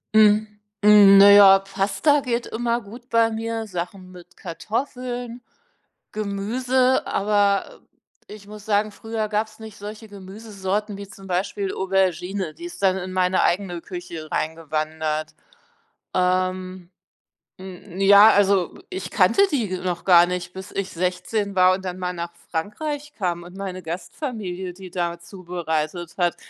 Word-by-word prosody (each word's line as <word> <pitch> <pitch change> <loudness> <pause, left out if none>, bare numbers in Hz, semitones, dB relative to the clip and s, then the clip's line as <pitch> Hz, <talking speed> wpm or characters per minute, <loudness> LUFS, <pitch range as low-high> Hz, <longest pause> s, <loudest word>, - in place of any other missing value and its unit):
Hm, 215 0 +5 0.3
hm, 205 -1 +8
naja, 200 -1 +9
Pasta 195 +9 +1
geht 240 -2 -2
immer 235 +1 -1
gut 240 +3 -13
bei 230 0 +3
mir, 225 0 -4
Sachen 185 0 -6
mit 180 -1 -15
Kartoffeln, 245 +5 -5 0.7
Gemüse, 245 +6 0
aber 200 -1 +1 0.5
ich 210 -1 -12
muss 210 0 -11
sagen, 210 0 +1
früher 220 0 -4
gab's 215 +1 -2
nicht 220 -2 -11
solche 215 +2 -9
Gemüsesorten 200 0 -5
wie 200 0 -8
zum 195 -1 -13
Beispiel 190 +2 -2
Aubergine, 190 -2 -1
die - - -11
ist 345 -10 -9
dann 190 -1 +3
in 185 0 -5
meine 185 0 +2
eigene 175 -2 0
Küche 175 -3 -8
reingewandert. 155 0 -3 0.8
Ähm, 185 0 -1 0.7
hm, 185 0 -10
ja, 200 +2 +8
also 195 -3 +2
ich 375 +1 -5
kannte 395 - +3
die 215 -10 -1
noch 180 -2 -3
gar 175 -2 +7
nicht, 180 0 -4
bis 190 0 -9
ich 195 -1 -3
16 185 +4 -2
war 185 0 +5
und 190 0 -9
dann 185 0 -4
mal 180 -1 -2
nach 170 0 -6 0.2
Frankreich 290 - -4
kam 175 -4 -2
und 180 +1 -13
meine 190 -2 -5
Gastfamilie, 185 - -5
die 185 0 -12
da 175 -1 -2
zubereitet 170 -2 -4
hat. 175 -2 +1
195 Hz, 140 wpm, -23 LUFS, 180-215 Hz, 0.8 s, naja